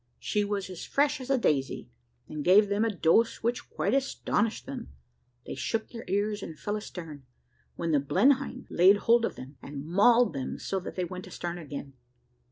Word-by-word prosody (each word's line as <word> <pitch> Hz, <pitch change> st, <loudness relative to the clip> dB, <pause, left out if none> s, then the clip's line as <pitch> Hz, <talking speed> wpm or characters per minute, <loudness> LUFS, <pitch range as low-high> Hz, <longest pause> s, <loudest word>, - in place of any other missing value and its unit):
She 210 Hz, -1 st, 0 dB
was 200 Hz, -1 st, -2 dB
as 185 Hz, -3 st, -8 dB
fresh 285 Hz, 0 st, +1 dB
as 255 Hz, -, -8 dB
a 270 Hz, -, +3 dB
daisy, 140 Hz, -, 0 dB, 0.4 s
and 150 Hz, -1 st, -5 dB
gave 200 Hz, +4 st, +6 dB
them 205 Hz, +2 st, +1 dB
a 230 Hz, -, +2 dB
dose 210 Hz, +4 st, +2 dB
which 235 Hz, +1 st, -1 dB
quite 200 Hz, -, -1 dB
astonished 245 Hz, -5 st, 0 dB
them. -, -, -7 dB, 0.6 s
They -, -, -5 dB
shook 220 Hz, +12 st, -2 dB
their 230 Hz, -1 st, -9 dB
ears, 205 Hz, +2 st, 0 dB
and 160 Hz, -, -7 dB
fell 205 Hz, -, -3 dB
astern, 165 Hz, -10 st, -8 dB, 0.5 s
when 170 Hz, -1 st, -2 dB
the 145 Hz, -, +4 dB
Blenheim 260 Hz, -, +2 dB
laid 190 Hz, +4 st, +6 dB
hold 230 Hz, +2 st, +3 dB
of -, -, -4 dB
them, 135 Hz, +2 st, -10 dB
and 140 Hz, 0 st, -7 dB
mauled 230 Hz, +8 st, +4 dB
them 135 Hz, -2 st, -4 dB
so 195 Hz, -, -2 dB
that 185 Hz, -, -8 dB
they 180 Hz, -, -1 dB
went 185 Hz, +1 st, -8 dB
astern 175 Hz, 0 st, -5 dB
again. 145 Hz, -3 st, -7 dB
200 Hz, 185 wpm, -28 LUFS, 160-230 Hz, 0.6 s, gave